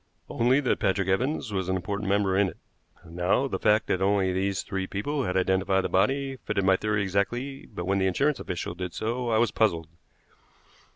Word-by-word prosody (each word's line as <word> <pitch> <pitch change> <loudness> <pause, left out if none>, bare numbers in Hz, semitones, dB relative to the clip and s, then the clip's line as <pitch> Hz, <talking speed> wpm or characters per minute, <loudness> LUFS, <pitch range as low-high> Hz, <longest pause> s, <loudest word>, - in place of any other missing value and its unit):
"Only 125 +4 +3
that 130 - 0
Patrick 95 0 +1
Evans 125 +3 0
was 95 -2 -2
an 95 - +1
important 100 +2 -3
member 100 -1 +2
in 100 0 +3
it. - - -13 0.5
Now 90 +10 0
the - - -3
fact 105 +1 +3
that 95 - -1
only 95 -1 +2
these 95 +1 -1
three 95 -1 -3
people 140 +8 -2
had 90 +1 -1
identified 95 +1 +2
the - - -2
body 135 +7 +1
fitted 105 -5 -2
my 95 0 +4
theory 105 +1 0
exactly; 120 +8 -2
but 85 - -6
when 100 +1 +1
the 95 - +2
insurance 140 +10 +1
official 85 -1 -4
did 90 -1 -6
so, 120 +2 -2
I 110 - +2
was 115 -2 +2
puzzled. 85 -9 +1
100 Hz, 195 wpm, -27 LUFS, 95-115 Hz, 0.5 s, my